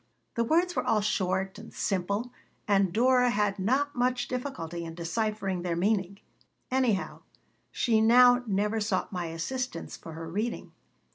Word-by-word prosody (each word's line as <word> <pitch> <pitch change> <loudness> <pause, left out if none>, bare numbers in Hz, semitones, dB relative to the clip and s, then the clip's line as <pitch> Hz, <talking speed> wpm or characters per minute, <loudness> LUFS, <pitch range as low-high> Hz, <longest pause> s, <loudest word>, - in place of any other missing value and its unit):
The 235 - +1
words 340 +7 +2
were - - 0
all 215 -1 +2
short 190 -2 -1
and - - -11
simple 200 +5 -2 0.3
and 195 -3 +3
Dora 250 +4 +4
had 205 -3 0
not 270 +9 +1
much 245 0 0
difficulty 175 - -4
in 165 0 -7
deciphering 195 +1 -2
their 175 -1 -2
meaning. 195 +1 0 0.5
Anyhow, 250 -7 0 0.5
she 225 -3 +2
now 245 +2 +6
never 210 +2 0
sought 205 -3 -1
my 175 -2 -2
assistance 170 +5 -4
for 165 - -10
her 165 +1 -7
reading. 210 +8 -3
210 Hz, 145 wpm, -28 LUFS, 185-245 Hz, 0.5 s, now